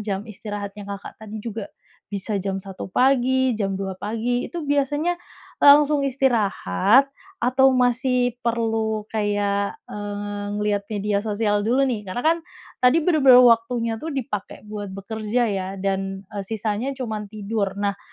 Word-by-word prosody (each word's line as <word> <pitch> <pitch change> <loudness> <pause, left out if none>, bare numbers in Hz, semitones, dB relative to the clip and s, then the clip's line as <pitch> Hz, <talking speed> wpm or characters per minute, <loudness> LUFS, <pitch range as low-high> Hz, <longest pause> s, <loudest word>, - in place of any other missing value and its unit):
jam 205 -1 -3
istirahatnya 205 -1 -7
Kakak 200 +2 -8
tadi 215 0 -8
juga 220 -2 -5 0.4
bisa 200 0 -3
jam 195 0 -2
1.00 195 0 -7
pagi, 260 +2 +3
jam 195 -3 -1
2.00 190 -1 -3
pagi, 230 +5 -2
itu 340 -3 -5
biasanya, 290 +5 0 0.4
e - - -12
langsung 290 0 +6
istirahat 245 - +3 0.3
atau 265 -4 +4
masih 250 0 +2
perlu 225 -2 -1
kayak, 205 -1 0
eee, 205 0 -5
ngelihat 210 -1 0
media 205 -1 0
sosial 210 -1 0
dulu, 255 +4 +3
nih? 220 -6 -2
Karena, 185 +7 -4
kan, 330 +1 +4 0.4
tadi 265 +6 +4
benar-benar 275 -7 +7
waktunya, 230 -1 +3
tuh, 320 +2 -5
dipakai 225 -7 -4
buat 205 -1 -5
bekerja, 220 +4 -2
ya, 190 -2 -2
dan, 195 0 -2
eee, 200 - -4
sisanya 220 +5 -2
cuman 220 -5 -4
tidur. 205 -1 -3
Nah, 200 0 -2
220 Hz, 140 wpm, -23 LUFS, 205-250 Hz, 0.4 s, benar-benar